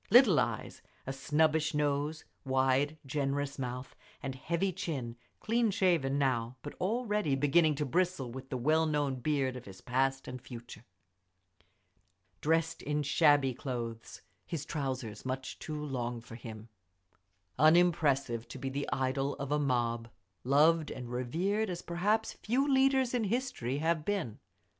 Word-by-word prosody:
Little 225 - +7
eyes, - - -2 0.2
a 135 - -3
snubbish 155 +2 +2
nose, 150 +1 0 0.2
wide, 135 +3 +2
generous 140 0 -2
mouth, 125 0 -5 0.3
and 135 -1 -3
heavy 170 +8 -1
chin; 130 -9 -4 0.2
clean 230 0 +2
shaven 170 -9 +2
now, 125 -3 0
but 145 - -6
already 210 - +1
beginning 150 +3 +3
to 150 +1 -1
bristle 170 -4 0
with 130 +2 -8
the 130 - -2
well 155 +6 +3
known 145 -3 0
beard 135 -1 0
of 125 - -8
his 95 -1 -11
past 135 +2 0
and 130 -1 -6
future. 120 -2 -10 1.6
Dressed 165 +1 +1
in 150 0 -1
shabby 145 -2 +4
clothes, 120 -3 -5 0.2
his 160 -5 -5
trousers 130 -8 -4
much 130 0 -4
too 150 -1 -5
long 120 -4 -3
for 115 0 -13
him. 115 -1 -9 0.9
Unimpressive, 145 -7 +4
to 125 - -8
be 135 +1 -3
the 140 +2 -3
idol 135 +1 0
of 140 0 -5
a 150 - +2
mob, 120 -4 0 0.3
loved 155 +4 +4
and 125 -2 -7
revered 180 - 0
as 175 -1 -4
perhaps 205 +6 0
few 260 +6 0
leaders 265 -2 +3
in 240 -3 +1
history 200 - -1
have 160 +1 +1
been. 180 - -2
145 Hz, 145 wpm, -32 LUFS, 130-165 Hz, 1.6 s, Little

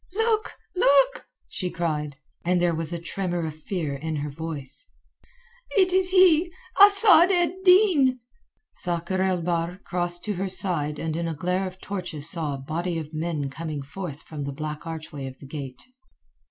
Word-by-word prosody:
"Look, 445 0 +1 0.2
look!" 280 -6 +3 0.2
she 180 - -3
cried, 150 -5 -3 0.3
and 180 +1 +2
there 175 -1 +2
was 165 0 -3
a 170 - -2
tremor 175 0 -3
of 155 - -4
fear 155 -1 -4
in 155 +3 -4
her 145 0 -3
voice. 160 - -6 0.9
"It 370 -2 +4
is 375 0 +4
he—Asad 375 +2 +6
ed 355 0 +1
Din." 360 -10 +5 0.5
Sakr 175 +1 -1
el 185 -2 +1
Bahr 170 +1 -1
crossed 175 -1 -2
to 210 - -1
her 190 +1 -3
side 150 -6 0
and 160 +1 -3
in 170 0 -2
a 165 - -3
glare 180 +4 -1
of 185 0 -10
torches 180 -8 -3
saw 160 -4 -1
a - - -6
body 165 +6 -3
of 155 -1 -6
men 155 -3 -2
coming 155 -2 -5
forth 150 0 -7
from 150 -2 -7
the 140 - -3
black 150 +3 -6
archway 155 -4 -6
of 130 - -9
the - - -13
gate. 135 -3 -7
170 Hz, 165 wpm, -25 LUFS, 155-200 Hz, 0.9 s, he—Asad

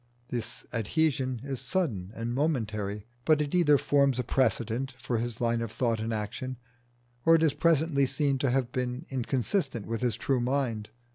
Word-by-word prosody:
The 120 -2 -1 0.3
adhesion 130 +1 0
is 135 -2 -4
sudden 130 - -1
and 115 +1 -3
momentary, 110 -8 -1 0.2
but 155 +2 +4
it 145 -1 -1
either 160 -5 +5
forms 140 -2 +3
a 125 - 0
precedent 125 +1 0
for 130 -3 -2
his 120 -1 -3
line 115 -1 +1
of 115 -2 -3
thought 115 -1 0
and 110 +1 -2
action, 120 +4 -4 0.7
or 165 - +7
it 165 - +3
is 155 -4 +3
presently 160 -4 +3
seen 135 +1 0
to 135 - +1
have 125 -1 +1
been 125 +4 -2
inconsistent 130 - -1
with 115 0 -3
his 120 -3 +1
true 135 -2 0
mind. 120 -4 -1
130 Hz, 170 wpm, -29 LUFS, 115-140 Hz, 0.7 s, or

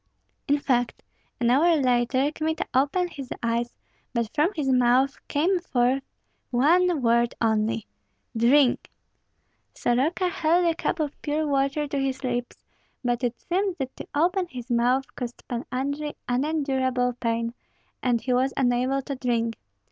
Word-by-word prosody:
In 285 - +3
fact, 245 -4 0 0.4
an 240 -1 +2
hour 325 +6 +5
later, 255 0 +2
Kmita 315 +1 -2
opened 290 +7 +1
his 275 -5 -8
eyes; 235 +1 -1 0.4
but 235 -1 -1
from 305 +4 +3
his 295 -4 -2
mouth 255 +2 +3
came 350 +6 +1
forth 260 -5 +1 0.5
one 320 +4 +3
word 235 0 +3
only, 220 0 +1 0.5
"Drink!" 245 +3 +3 0.9
Soroka 290 +10 +1
held 345 -1 +2
a 335 - +3
cup 325 - -2
of 300 -2 -3
pure 305 +1 -1
water 280 +1 0
to 285 -1 -2
his 270 0 -2
lips; 245 -1 -3 0.4
but 245 0 0
it 240 -1 -1
seemed 380 +1 -1
that 265 -3 -4
to - - -8
open 355 +4 +2
his 250 -4 -8
mouth 245 +3 +2
caused 245 -1 -7
Pan 240 0 -4
Andrei 285 +3 -2
unendurable 260 -2 0
pain, 230 0 -1 0.5
and 240 -3 +1
he 255 - 0
was 260 +2 +1
unable 255 +1 +1
to 280 - -4
drink. 235 -3 -1
265 Hz, 145 wpm, -25 LUFS, 245-300 Hz, 0.9 s, hour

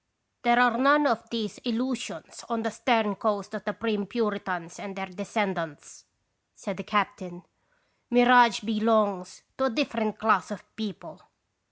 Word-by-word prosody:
" - - -51
There 240 0 +5
are 245 -1 +4
none 290 +3 +5
of 235 -6 0
these 220 -4 -4
illusions 245 +1 -4
on 230 -1 -2
the 225 - -2
stern 225 -2 +1
coast 210 -1 -2
of 210 -2 -6
the 210 - -2
prim 210 -3 -2
Puritans 195 -6 -3
and 195 -1 -8
their 195 -1 -4
descendants," 185 -4 -4 0.5
said 195 - -6
the 195 - -6
captain. 185 -3 -2 0.3
" - - -44
Mirage 245 -2 +6
be 215 0 -2
longs 205 -4 +1 0.2
to 265 - +2
a - - +2
different 225 -5 -1
class 220 0 +2
of 210 -3 -10
people." 210 -5 -8
215 Hz, 160 wpm, -27 LUFS, 195-235 Hz, 0.5 s, Mirage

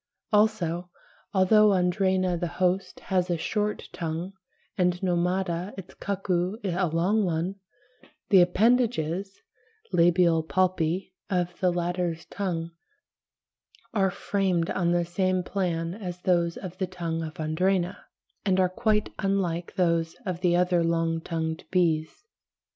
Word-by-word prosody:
Also, 180 -5 +2 0.4
although 210 +2 +5
Andrena 185 0 +2
the 175 +1 -2
host 180 +2 -1
has 185 -2 0
a 175 - +1
short 210 +5 -2
tongue, 165 +3 -4 0.4
and 180 -1 +1
Nomada, 180 +1 0
its 190 -2 -9
cuckoo, 190 -1 -1
a 185 -1 0
long 180 +7 +1
one, 175 +2 -1 0.7
the 190 -3 +7
appendages 195 -2 +1 0.5
(labial 170 -1 +4
palpi) 180 +1 0 0.2
of 180 -2 +1
the 180 -1 +3
latter's 175 -1 -2
tongue 170 -4 -3 1.2
are 195 -3 +3
framed 185 -3 0
on 175 -2 +1
the 175 0 +2
same 185 +1 0
plan 170 -3 -2
as 180 -4 -6
those 170 -2 +1
of 185 -1 -8
the 190 - 0
tongue 170 -3 -3
of 160 -1 -6
Andrena, 180 +4 0 0.5
and 190 -2 +2
are 185 -1 +4
quite 210 +3 0
unlike 180 -4 -1
those 165 -3 +1
of 180 -2 -3
the 175 -1 +3
other 180 -1 +3
long 165 0 0
tongued 160 0 -3
bees. 165 - 0
180 Hz, 125 wpm, -27 LUFS, 170-190 Hz, 1.2 s, the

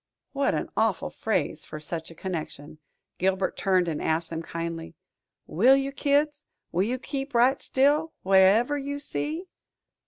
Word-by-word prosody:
what 280 0 +1
an - - -2
awful - - +1
phrase - - -1
for 155 - -8
such 160 +2 -6
a 165 - -12
connection! 155 -4 -6 0.4
Gilbert 190 +1 +1
turned 185 -3 +2
and 155 -3 -2
asked 160 +1 -1
them 165 0 -3
kindly, 165 0 -5 0.5
"Will 245 +11 +5
you, 275 0 -1
kids? 290 +1 +1 0.3
Will 175 - +1
you 235 +6 0
keep 270 0 -5
right 250 +3 +4
still, 295 +4 +2
whatever 195 +9 +4
you 285 +1 -4
see?" 305 +4 -4
200 Hz, 150 wpm, -26 LUFS, 170-280 Hz, 0.5 s, Will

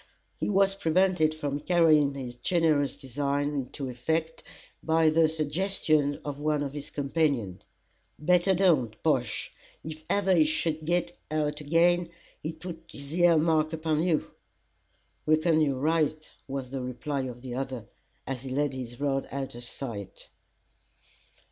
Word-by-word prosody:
He - - -1
was 195 -1 +4
prevented 180 -3 +2
from 145 -2 -3
carrying 155 -4 +4
his 130 -3 -5
generous 145 +1 +1
design 140 +2 -1
into 140 -1 -4
effect 160 +6 -2 0.4
by 160 -1 +3
the 160 0 +4
suggestion 155 -2 +1
of 145 -1 -4
one 150 -1 0
of 140 -1 -4
his 145 0 -6
companions. 140 - -1 0.6
"Better 180 +4 +3
don't, 155 - +3
Bosh; 130 -8 0 0.3
if 155 0 -7
ever 195 -2 +3
he 165 -3 +6
should 155 0 -1
git 175 +1 0
out 150 -1 -1
agen, 170 +3 +3 0.3
he'd 160 +1 -5
put 165 -1 -7
his 140 +1 -8
ear 175 -2 +5
mark 155 0 +2
upon 160 -1 0
you." 165 -3 0 1.0
"Reckon 155 +1 +3
you're 140 -3 +2
right," 155 +1 0 0.2
was 135 -2 -5
the 135 -1 -3
reply 130 +2 -3
of 125 0 -9
the 125 -2 -5
other, 130 -3 -4 0.4
as 130 -2 -4
he 135 - -7
laid 140 +1 0
his 120 -2 -7
rod 135 -1 0
out 135 -1 -4
of 120 +1 -9
sight. 115 -5 -6
150 Hz, 145 wpm, -28 LUFS, 135-165 Hz, 1.0 s, he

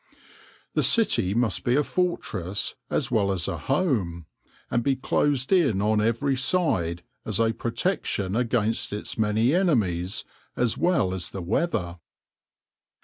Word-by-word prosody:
The - - +2
city 110 - +2
must 115 -4 +1
be 125 -1 +2
a 150 - +3
fortress 105 - -1 0.2
as - - -1
well 100 -3 +2
as 90 -4 -1
a - - -3
home, 115 - -1 0.5
and 120 - +2
be 135 +3 +1
closed 135 +2 0
in 140 - +3
on 105 +1 +2
every 115 +5 +1
side 110 - +1 0.2
as 110 -2 -1
a 115 0 +2
protection 115 - -2
against 115 -3 0
its 105 - -5
many 110 +5 +2
enemies, 110 - +1 0.3
as 120 -3 +1
well 170 - +1
as 90 -2 -3
the 95 - -6
weather. 90 - -1
115 Hz, 140 wpm, -25 LUFS, 95-140 Hz, 0.5 s, a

